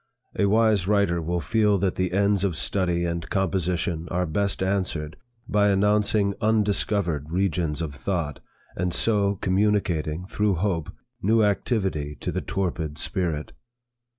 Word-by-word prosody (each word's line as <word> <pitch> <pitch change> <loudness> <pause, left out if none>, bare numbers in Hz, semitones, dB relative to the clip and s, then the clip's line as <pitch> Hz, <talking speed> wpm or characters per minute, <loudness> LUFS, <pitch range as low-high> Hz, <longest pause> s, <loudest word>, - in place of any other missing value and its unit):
A 100 - +2
wise 110 -3 +3
writer 100 -5 +2
will 85 +2 -1
feel 105 +5 +2
that 95 -1 0
the 95 -1 -1
ends 100 +1 +2
of 90 -6 0
study 90 -1 +1
and 85 -1 -3
composition 90 -3 -1
are 90 0 0
best 95 +4 -1
answered 90 -5 -1 0.3
by 105 0 +3
announcing 105 0 +2
undiscovered 100 -7 +1
regions 85 -3 0
of 75 -3 -5
thought, 75 +1 -3 0.4
and 90 0 -1
so 100 -1 +2
communicating, 95 -5 0
through 100 0 0
hope, 85 -3 -1 0.3
new 110 +3 +3
activity 95 - 0
to - - -2
the - - -2
torpid 80 -5 -3
spirit. 80 -5 -2
95 Hz, 135 wpm, -25 LUFS, 85-100 Hz, 0.4 s, wise